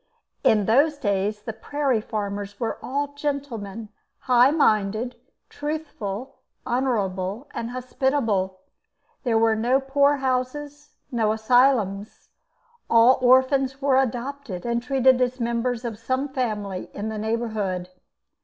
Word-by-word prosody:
In 210 -2 +4
those 285 +8 +3
days 205 -3 -1
the 225 - -5
prairie 275 -1 -1
farmers 205 -2 -4
were 230 - -2
all 285 +2 -2
gentlemen, 245 -8 -4 0.3
high 250 0 +5
minded, 220 -4 +1 0.3
truthful, 285 -7 -5 0.3
honourable, 210 -3 -1
and 230 - -4
hospitable. 245 -7 -1 0.6
There 235 -4 +2
were 225 0 +3
no 240 +5 +2
poor 280 +1 +3
houses, 280 +3 -3 0.2
no 225 -3 +1
asylums. 220 -3 +1 0.6
All 235 +3 +6
orphans 260 +1 +3
were 270 -1 +3
adopted 245 -5 -4
and 235 0 0
treated 260 0 +3
as 250 +1 0
members 235 +1 -1
of 220 -3 -5
some 260 +5 -1
family 210 -8 -3
in 210 +2 -3
the 215 -1 -4
neighbourhood. 215 -5 -2
240 Hz, 115 wpm, -24 LUFS, 215-270 Hz, 0.6 s, All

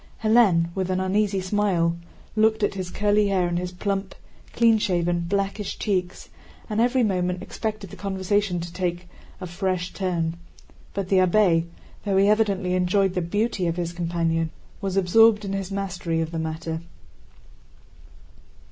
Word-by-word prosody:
Hélène 205 -7 +4
with 190 -1 -2
an 185 0 0
uneasy 195 +1 +1
smile 185 -4 +1 0.4
looked 220 0 +3
at - - +2
his 185 -2 -5
curly 205 +2 +2
hair 185 -3 +1
and 175 0 -1
his 180 0 -4
plump, 195 +1 -3 0.4
clean 230 -2 +4
shaven, 175 -3 +1
blackish 200 +3 -2
cheeks 185 -4 -2 0.4
and 215 0 0
every 250 +1 +3
moment 180 -3 0
expected 210 -1 -5
the - - -8
conversation 195 -1 -1
to 170 0 -7
take 175 -1 -3 0.3
a 185 - -5
fresh 180 0 -2
turn. 170 -4 -1 0.6
But 195 -2 -3
the 195 - +4
abbé, 180 -3 +3 0.4
though 200 -2 +1
he 195 +1 +5
evidently 200 -4 +2
enjoyed 185 +1 +2
the 180 - -1
beauty 205 +2 -1
of 165 - -1
his 175 -1 -3
companion, 165 -1 -1 0.3
was 195 -1 -2
absorbed 210 +3 +5
in 195 - -3
his 195 -1 -3
mastery 185 -4 -2
of 160 0 -2
the 165 - -3
matter. 160 0 -4
185 Hz, 155 wpm, -24 LUFS, 175-205 Hz, 0.6 s, he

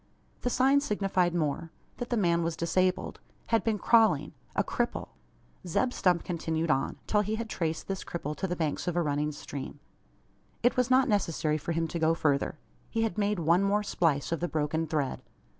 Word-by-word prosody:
The 245 - 0
sign 265 +3 +4
signified 195 -9 +1
more 165 0 -1 0.3
that 245 - -5
the 240 - +1
man 170 -4 +2
was 165 0 -1
disabled 185 +2 0 0.3
had 225 -1 +2
been 220 -2 +1
crawling 205 -10 +3 0.2
a - - +3
cripple! - - -2 0.6
Zeb 245 +9 +1
Stump 180 -2 +2
continued 165 -2 -1
on, 135 - 0
till 210 - +2
he 210 +1 -1
had 230 +1 -4
traced 165 -6 -3
this 195 -1 -3
cripple 150 -3 -4
to 190 - -1
the 180 - -2
banks 160 -2 -2
of 175 - 0
a 175 - +2
running 150 0 0
stream. 145 -1 -7 0.8
It 245 - +4
was 250 0 +2
not 260 +1 +5
necessary 165 - +1
for 170 - -3
him 165 0 0
to 170 - -3
go 160 +1 +3
further. 145 -2 0 0.3
He 225 - 0
had 220 -1 -1
made 205 0 +1
one 170 +2 +3
more 205 +1 +2
splice 160 -8 0
of 165 - 0
the 175 - -1
broken 160 +1 -1
thread. 145 -4 -1
170 Hz, 190 wpm, -29 LUFS, 160-210 Hz, 0.8 s, not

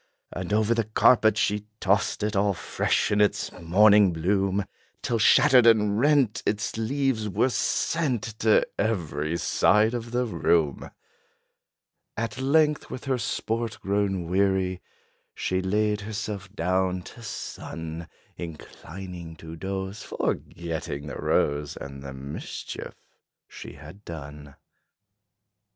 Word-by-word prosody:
And 90 +1 -5
over 110 +2 +3
the 115 -2 0
carpet 110 0 +4
she 105 0 0
tossed 100 +1 +1
it, 105 0 -1
All 100 0 +2
fresh - - 0
in 105 0 +3
its 105 -1 +1
morning 100 +3 +5
bloom, 95 +4 0 0.4
Till 115 -2 0
shattered 125 +2 +6
and 105 -2 +4
rent, 135 -5 +3
its 105 0 -1
leaves 115 -1 0
were 115 +7 +2
sent 135 -5 0 0.2
To 110 -1 +4
every 85 -7 -1
side 105 +5 +3
of 120 -1 -4
the 125 +1 0
room. 80 - +1 1.3
At 115 +3 -3
length, 150 +2 +2
with 130 - -7
her 130 -2 0
sport 115 +1 -2
grown 95 -3 -1
weary, 95 0 +1 0.5
She 95 0 -1
laid 105 +2 0
herself 105 -2 -5
down 90 -1 0
to 120 - -12
sun, 85 -6 -6 0.3
Inclining 85 +1 -8
to 80 0 -9
doze, 95 +3 -4
forgetting 80 -4 -4
the 75 - -6
rose 75 0 0
And 70 0 -8
the 70 -1 -8
mischief 70 +2 -7 0.5
she - - -10
had 90 +8 -13
done. 75 -4 -9
100 Hz, 120 wpm, -26 LUFS, 85-110 Hz, 1.3 s, shattered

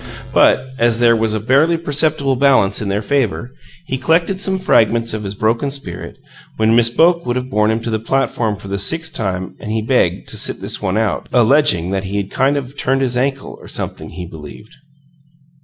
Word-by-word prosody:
But, 130 - +3
as 115 -1 +3
there 120 -1 +4
was 110 -1 0
a - - -1
barely 140 +9 +3
perceptible 150 -3 0
balance 125 -8 +3
in 105 - -3
their 100 +2 -1
favor, 125 - -1 0.3
he 130 -4 -3
collected 165 +6 +1
some 190 -1 0
fragments 115 - +2
of 110 - -3
his 100 -1 -5
broken 115 +7 0
spirit, 100 -11 -8 0.4
when 110 +1 +3
Miss 120 -1 +4
Boke 170 +7 +3
would 120 0 -2
have 125 +1 -4
borne 105 -1 +2
him 110 +1 0
to 115 0 -4
the 110 - 0
platform 115 -2 -1
for 100 - -11
the 100 0 -3
sixth 160 +9 -2
time, 95 -4 -3
and 110 0 -3
begged - - +1
to - - -2
"sit - - +1
this - - -5
one 100 0 -1
out," 110 -2 -1
alleging 120 - +3
that 95 0 -2
he 100 +2 -3
had 100 -1 -3
"kind 135 +2 +1
of 135 0 -6
turned 135 -1 0
his 125 -2 0
ankle, 135 +2 -2
or - - -12
something," - - -4
he 90 - -7
believed. 80 +6 -12
115 Hz, 205 wpm, -17 LUFS, 105-140 Hz, 0.4 s, there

